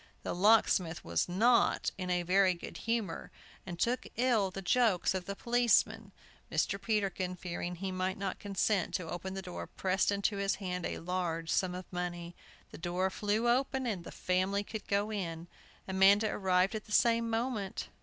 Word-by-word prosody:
The -, -, -2 dB
locksmith 185 Hz, -3 st, +3 dB
was 85 Hz, -, 0 dB
not 230 Hz, +7 st, +3 dB
in 180 Hz, -2 st, -1 dB
very 185 Hz, 0 st, +4 dB
good 170 Hz, -, -8 dB
humor, 225 Hz, -8 st, -1 dB, 0.4 s
and 175 Hz, -2 st, -5 dB
took 240 Hz, +8 st, 0 dB
ill 235 Hz, -5 st, +2 dB
the 195 Hz, +1 st, -7 dB
jokes 215 Hz, -3 st, +2 dB
of 185 Hz, -1 st, -3 dB
the 200 Hz, -, -4 dB
policeman. 240 Hz, +1 st, +2 dB, 0.4 s
Mr. 195 Hz, 0 st, 0 dB
Peterkin, 195 Hz, -4 st, -1 dB
fearing 175 Hz, 0 st, -5 dB
he 190 Hz, +2 st, -4 dB
might 185 Hz, 0 st, -2 dB
not 195 Hz, -1 st, -3 dB
consent 200 Hz, -1 st, 0 dB
to 180 Hz, -, -3 dB
open 190 Hz, +2 st, -5 dB
the 195 Hz, -, -5 dB
door, 180 Hz, -1 st, -6 dB
pressed 190 Hz, +1 st, 0 dB
into 200 Hz, +1 st, 0 dB
his 200 Hz, 0 st, 0 dB
hand 180 Hz, -3 st, -3 dB
a -, -, -4 dB
large 165 Hz, -2 st, -2 dB
sum 180 Hz, -1 st, +1 dB
of 185 Hz, 0 st, -6 dB
money. 175 Hz, -1 st, -4 dB, 0.4 s
The -, -, -10 dB
door 180 Hz, +2 st, -1 dB
flew 210 Hz, +4 st, 0 dB
open; 265 Hz, +2 st, +1 dB, 0.2 s
the 170 Hz, -, -9 dB
family 185 Hz, +2 st, 0 dB
could 215 Hz, +1 st, -7 dB
go 205 Hz, +2 st, 0 dB
in. 170 Hz, -5 st, -4 dB, 0.4 s
Amanda 195 Hz, +3 st, +4 dB
arrived 185 Hz, 0 st, +2 dB
at 215 Hz, -1 st, -5 dB
the 215 Hz, -, -14 dB
same 230 Hz, +1 st, +3 dB
moment. 225 Hz, -4 st, -2 dB
190 Hz, 170 wpm, -32 LUFS, 180-210 Hz, 0.4 s, very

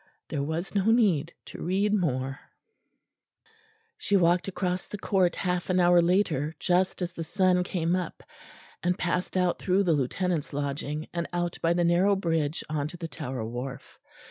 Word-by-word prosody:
There 140 Hz, -, -2 dB
was 160 Hz, +5 st, -3 dB
no 200 Hz, -2 st, +1 dB
need 205 Hz, -9 st, +3 dB
to -, -, -9 dB
read 195 Hz, +4 st, +1 dB
more. 135 Hz, -8 st, 0 dB, 1.6 s
She 200 Hz, -, +2 dB
walked 175 Hz, 0 st, +3 dB
across 185 Hz, -1 st, -2 dB
the 210 Hz, -, -6 dB
court 190 Hz, -3 st, +1 dB
half 180 Hz, -1 st, -2 dB
an 185 Hz, 0 st, +3 dB
hour 175 Hz, 0 st, +6 dB
later, 170 Hz, -4 st, +1 dB
just 180 Hz, 0 st, +1 dB
as 175 Hz, -, -3 dB
the 170 Hz, -1 st, -5 dB
sun 180 Hz, +1 st, +2 dB
came 175 Hz, -1 st, 0 dB
up; 180 Hz, -3 st, -4 dB, 0.6 s
and 180 Hz, +1 st, 0 dB
passed 180 Hz, +1 st, -1 dB
out 180 Hz, -1 st, +1 dB
through 190 Hz, +1 st, +2 dB
the 175 Hz, -4 st, +3 dB
Lieutenant's 155 Hz, +4 st, -1 dB
lodging, 145 Hz, +2 st, -3 dB
and 170 Hz, 0 st, -2 dB
out 175 Hz, -1 st, -2 dB
by 165 Hz, +1 st, +3 dB
the 175 Hz, 0 st, +1 dB
narrow 180 Hz, +4 st, +4 dB
bridge 165 Hz, -4 st, -1 dB
on 150 Hz, -2 st, -1 dB
to 175 Hz, -, -9 dB
the 165 Hz, -1 st, -5 dB
Tower 130 Hz, -7 st, -5 dB
wharf. 125 Hz, +3 st, -7 dB
175 Hz, 170 wpm, -27 LUFS, 155-185 Hz, 1.6 s, hour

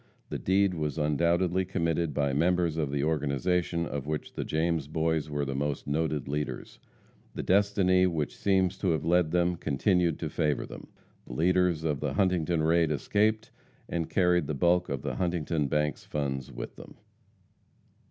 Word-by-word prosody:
The -, -, -4 dB
deed 95 Hz, 0 st, +2 dB
was 75 Hz, -2 st, -3 dB
undoubtedly 85 Hz, +5 st, +1 dB
committed 85 Hz, -3 st, -1 dB
by 70 Hz, -1 st, 0 dB
members 85 Hz, +2 st, +2 dB
of 75 Hz, -3 st, -1 dB
the 70 Hz, 0 st, -1 dB
organization 80 Hz, +3 st, 0 dB
of 70 Hz, -3 st, -5 dB
which 75 Hz, 0 st, -4 dB
the -, -, -3 dB
James 80 Hz, -2 st, -1 dB
Boys 80 Hz, 0 st, -1 dB
were 75 Hz, -1 st, -2 dB
the 70 Hz, -, -3 dB
most 70 Hz, +1 st, -2 dB
noted 75 Hz, -1 st, -1 dB
leaders. 75 Hz, +2 st, -4 dB, 0.6 s
The -, -, -3 dB
destiny 95 Hz, -2 st, +3 dB
which 80 Hz, -4 st, -2 dB
seems 95 Hz, -1 st, +1 dB
to 95 Hz, -, 0 dB
have 80 Hz, -1 st, -2 dB
led 90 Hz, -1 st, +3 dB
them 90 Hz, +1 st, +1 dB
continued 85 Hz, +5 st, +1 dB
to 80 Hz, -, -4 dB
favor 75 Hz, -3 st, 0 dB
them. -, -, -10 dB, 0.4 s
The -, -, -8 dB
leaders 90 Hz, +2 st, +2 dB
of 75 Hz, -4 st, -1 dB
the 75 Hz, -2 st, -2 dB
Huntington 85 Hz, -2 st, +1 dB
raid 80 Hz, 0 st, +3 dB
escaped, 105 Hz, +8 st, 0 dB, 0.4 s
and 85 Hz, -2 st, -3 dB
carried 90 Hz, -4 st, +2 dB
the 75 Hz, -, -2 dB
bulk 90 Hz, +4 st, +2 dB
of 70 Hz, -1 st, -3 dB
the -, -, -3 dB
Huntington 85 Hz, -4 st, 0 dB
bank's 75 Hz, +2 st, -1 dB
funds 70 Hz, -3 st, -3 dB
with -, -, -7 dB
them. -, -, -12 dB
80 Hz, 165 wpm, -28 LUFS, 75-90 Hz, 0.6 s, destiny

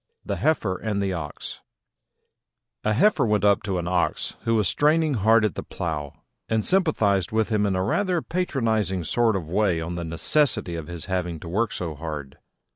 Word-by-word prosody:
THE -, -, -2 dB
HEIFER 110 Hz, -12 st, +1 dB
AND 105 Hz, +1 st, -2 dB
THE 100 Hz, -1 st, 0 dB
OX 75 Hz, -4 st, -6 dB, 1.2 s
A 110 Hz, -, +2 dB
Heifer 160 Hz, -, +3 dB
went 105 Hz, -3 st, +1 dB
up 100 Hz, -1 st, +4 dB
to 95 Hz, -3 st, -2 dB
an 85 Hz, -1 st, -3 dB
Ox, 90 Hz, -1 st, 0 dB
who 115 Hz, -, +2 dB
was 105 Hz, -4 st, +2 dB
straining 150 Hz, -, +3 dB
hard 110 Hz, 0 st, +4 dB
at 105 Hz, -, 0 dB
the -, -, -4 dB
plough, 75 Hz, -4 st, -5 dB, 0.3 s
and 110 Hz, -1 st, +1 dB
sympathised 110 Hz, -, +2 dB
with 110 Hz, 0 st, +1 dB
him 105 Hz, -2 st, +2 dB
in 95 Hz, -, 0 dB
a 95 Hz, -, 0 dB
rather 180 Hz, -, 0 dB
patronising 110 Hz, -, -1 dB
sort 115 Hz, +6 st, +2 dB
of 90 Hz, -5 st, -3 dB
way 95 Hz, -1 st, +1 dB
on 80 Hz, +2 st, -4 dB
the 85 Hz, 0 st, -4 dB
necessity 85 Hz, -, +1 dB
of 80 Hz, -2 st, -5 dB
his 85 Hz, -2 st, -6 dB
having 90 Hz, -3 st, -2 dB
to -, -, -8 dB
work 105 Hz, +6 st, 0 dB
so 85 Hz, -3 st, -4 dB
hard. 75 Hz, -3 st, -7 dB
100 Hz, 190 wpm, -24 LUFS, 85-115 Hz, 1.2 s, up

